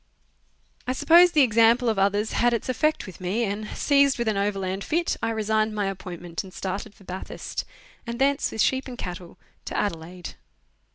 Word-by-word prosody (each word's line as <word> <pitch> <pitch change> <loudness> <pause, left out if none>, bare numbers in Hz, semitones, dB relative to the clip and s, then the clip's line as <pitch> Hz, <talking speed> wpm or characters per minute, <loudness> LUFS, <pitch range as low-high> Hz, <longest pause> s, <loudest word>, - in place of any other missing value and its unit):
I 255 - +1
suppose 340 +6 +6
the 300 -3 +6
example 230 +1 +4
of 220 -3 +1
others 205 +2 +1
had 240 0 +2
its 235 - -4
effect 305 +5 +1
with 185 -1 -11
me, 195 +6 0
and, 210 0 -3
seized 280 -1 +3
with 235 -1 -2
an 215 - +1
overland 195 -1 -1
fit, 340 +2 0
I - - 0
resigned 220 -1 0
my 205 -1 0
appointment 175 -3 -5
and 190 - -12
started 195 +3 -5
for - - -19
Bathurst, 185 0 -6 0.4
and 235 0 -4
thence 275 +2 +1
with 220 - -1
sheep 265 +1 +1
and 250 -2 -8
cattle 180 -2 -7 0.3
to - - -4
Adelaide. 175 -2 -4
215 Hz, 180 wpm, -25 LUFS, 190-245 Hz, 0.4 s, suppose